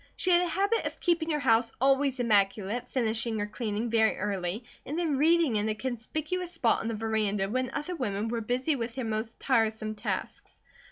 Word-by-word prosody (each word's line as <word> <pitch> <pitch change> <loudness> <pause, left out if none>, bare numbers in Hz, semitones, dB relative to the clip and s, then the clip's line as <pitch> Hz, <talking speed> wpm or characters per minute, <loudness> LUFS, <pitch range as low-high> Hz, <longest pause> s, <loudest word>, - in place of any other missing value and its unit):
She 370 - +1
had 350 0 +6
a 360 - 0
habit 400 +7 +1
of - - -8
keeping 335 -2 +1
her 300 -2 +1
house 230 -2 +3
always 270 0 +2
immaculate, 210 +1 +1
finishing 230 -2 0
her 205 - -1
cleaning 220 +1 -3
very 220 -1 +3
early 195 +2 -2 0.2
and 300 - -4
then 330 -5 +1
reading 320 -6 +4
in 210 +1 0
a 215 - 0
conspicuous 305 +10 -3
spot 235 -9 +2
on - - -4
the 230 - -2
veranda 210 -3 0
when 255 +4 -1
other 360 +5 -3
women 215 -7 -2
were 230 0 -2
busy 255 +7 0
with 230 -2 -4
their 260 -3 -3
most 220 +1 -3
tiresome 220 -4 +1
tasks. 210 - -5
235 Hz, 190 wpm, -29 LUFS, 215-285 Hz, 0.2 s, had